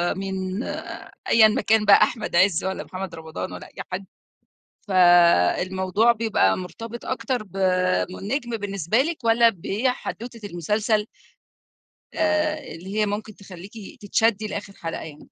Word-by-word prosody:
مين 190 +2 -3 0.7
أيًا 220 -1 +7
ما 215 - 0
كان 220 -1 +3
بقى 200 - +7
أحمد 220 -7 -2
عِز 185 -1 +4
والّا 190 0 -3
محمد 185 -2 -7
رمضان 160 +3 -6
والّا - - -9
أي - - -8
حد، 190 +1 -4 0.8
فالموضوع 185 - +4
بيبقى 215 - +1
مرتبط 225 +6 -8
أكتر 245 -1 -2
ب 195 -2 -14 0.5
من - - -8
النجم 235 +2 -3
بالنسبة 200 0 -1
لِك 310 -5 -4
والّا 230 +1 +5
بحدوتة 230 +3 -4
المسلسل 210 +5 0 1.1
آآ 310 -1 +1 0.2
اللي 190 +5 -8
هي 210 - +3
ممكن 210 +1 -4
تخلّيكِ 190 0 -12 0.3
تتشدي 215 +1 +1
لآخر 200 -1 -6
حلقة 165 -3 -6
يعني؟ 150 -2 -11
205 Hz, 135 wpm, -23 LUFS, 185-230 Hz, 1.1 s, أيًا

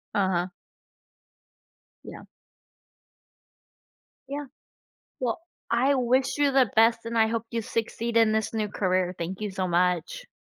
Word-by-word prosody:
Uh-huh. 185 -3 +1 1.6
Yeah. - - -10 2.0
Yeah. 285 +1 -4 0.8
Well, 245 +2 -1 0.3
I 260 +4 +3
wish 260 +1 +1
you 290 -1 +3
the 260 -5 +4
best 230 +1 +4
and 230 0 -3
I 220 -1 +4
hope 230 0 -2
you 230 -1 -2
succeed 230 +1 -3
in 225 -1 +4
this 220 0 0
new 215 -2 -1
career, 185 -2 0
thank 180 +3 -4
you 210 -1 -3
so 190 -1 -2
much. 180 - 0
225 Hz, 125 wpm, -26 LUFS, 190-245 Hz, 2.0 s, the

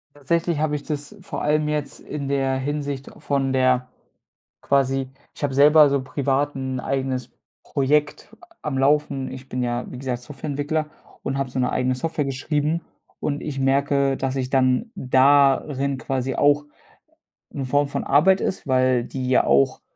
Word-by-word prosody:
Tatsächlich 165 +2 0
habe 155 -1 0
ich 145 - -5
das 150 +5 -5
vor - - -5
allem 150 0 +1
jetzt 150 -2 -3
in 145 -2 -5
der 135 -1 0
Hinsicht 140 0 -3
von 135 -2 0
der 130 -1 +2 0.8
quasi 135 -1 +1 0.3
ich - - -13
habe 135 -2 -1
selber 150 +1 +7
so 140 -1 +1
privat 140 +2 -1
'n 130 -1 -3
eigenes 130 -2 -2 0.3
Projekt 145 +1 0 0.3
am 135 -3 -2
Laufen. 140 -1 +1
Ich 130 0 -9
bin 125 0 -3
ja, 120 0 -1
wie 125 - -8
gesagt, 125 -2 -3
Softwareentwickler 145 +3 -3 0.4
und 135 0 -2
habe 135 -2 -2
so 130 - -4
'ne 125 - +1
eigene 130 0 0
Software 150 +2 -2
geschrieben 150 +4 -1 0.4
und 145 -1 -2
ich 140 -3 -4
merke, 140 0 +2
dass 135 0 -2
ich 130 -1 -1
dann 130 - +2
darin 135 +1 +3
quasi 130 +1 -2
auch 145 0 +3 0.9
'ne 135 - -4
Form 145 +3 +2
von 140 - -3
Arbeit 185 +8 +4
ist, - - -3
weil 130 -2 +2
die 130 0 -4
ja 130 - +4
auch 70 0 +3
135 Hz, 160 wpm, -23 LUFS, 130-145 Hz, 0.9 s, selber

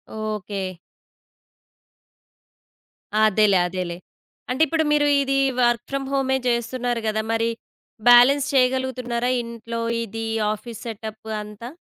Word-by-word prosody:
Okay. 205 -4 -4 2.5
అదేలే. 210 -2 +4
అదేలే. 180 -1 -4 0.5
అంటే 260 +5 -1
ఇప్పుడు 320 +2 +1
మీరు 295 0 +3
ఇది 275 0 +1 0.2
వర్క్ 240 -2 +2
ఫ్రమ్ 275 0 -2
హోమే 265 -1 +1
జేస్తున్నారు 240 0 -1
గదా! 215 0 0
మరి 230 0 +1 0.6
బ్యాలెన్స్ 265 +4 +7
చేయగలుగుతున్నారా? 255 -2 +1
ఇంట్లో 230 0 -6 0.2
ఇది 225 +1 -5 0.3
ఆఫీస్ 220 +1 -9
సెటప్పు 220 0 -7
అంతా. 210 +3 -9
235 Hz, 100 wpm, -23 LUFS, 215-260 Hz, 2.5 s, బ్యాలెన్స్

